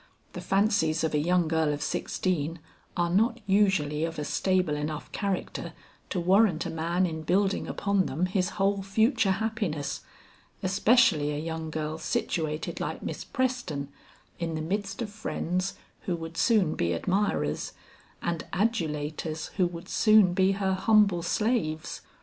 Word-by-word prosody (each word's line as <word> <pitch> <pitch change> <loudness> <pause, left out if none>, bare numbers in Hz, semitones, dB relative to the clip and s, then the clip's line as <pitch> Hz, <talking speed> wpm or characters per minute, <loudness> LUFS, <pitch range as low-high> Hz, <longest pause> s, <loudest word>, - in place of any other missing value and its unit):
The - - -6
fancies 195 -6 +2
of 160 - 0
a 150 - +3
young 175 +2 +2
girl 160 -1 +1
of 145 0 -3
sixteen 165 -3 -1 0.4
are 170 -1 +1
not 230 +6 +2
usually 190 -7 +2
of 165 0 -3
a 150 - -2
stable 185 -4 +1
enough 150 +1 -4
character 195 -2 -3 0.4
to 185 - -1
warrant 185 -1 +3
a 170 - -3
man 170 +3 0
in 160 -2 -3
building 195 +5 +1
upon 200 -2 0
them 160 +7 0
his 185 0 0
whole 200 0 +2
future 220 +1 +2
happiness, 205 - -2 0.6
especially 195 - +4
a - - -3
young 160 0 -4
girl 155 0 -3
situated 155 -2 -2
like - - -4
Miss - - -4
Preston 245 - -2 0.5
in 165 -1 -2
the 155 - -2
midst 195 +6 -2
of 210 - -6
friends 185 -3 -2 0.3
who 180 - +1
would 165 0 -7
soon 200 -6 +3
be 85 0 0
admirers, 185 - -1 0.5
and 170 -2 -1
adulators 155 -6 -2
who 185 -3 +4
would 170 -1 -8
soon 215 -5 +5
be 190 +1 +3
her 195 -1 0
humble 200 -2 +4
slaves. 175 -4 -1
180 Hz, 150 wpm, -28 LUFS, 160-200 Hz, 0.6 s, soon